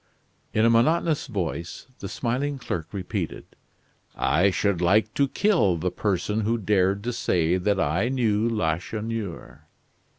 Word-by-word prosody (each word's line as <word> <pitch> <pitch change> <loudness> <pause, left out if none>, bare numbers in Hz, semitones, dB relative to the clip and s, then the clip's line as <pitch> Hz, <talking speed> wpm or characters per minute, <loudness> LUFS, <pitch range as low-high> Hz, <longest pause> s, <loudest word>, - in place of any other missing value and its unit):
In 110 - +2
a - - +5
monotonous 155 +6 +2
voice, 90 - -4
the 100 - -6
smiling 130 +6 -2
clerk 90 - -4
repeated: 95 -3 -4 0.7
"I 90 +7 +3
should 95 -2 0
like 105 +5 +3
to 140 - +2
kill 165 - +2
the 90 +2 -1
person 105 +2 -1
who 115 +2 +1
dared 100 -1 +1
to 120 +1 -2
say 90 -6 +1
that 100 +2 0
I 95 +9 +1
knew 115 -4 +1
Lacheneur." 95 - -3
105 Hz, 135 wpm, -25 LUFS, 90-115 Hz, 0.7 s, a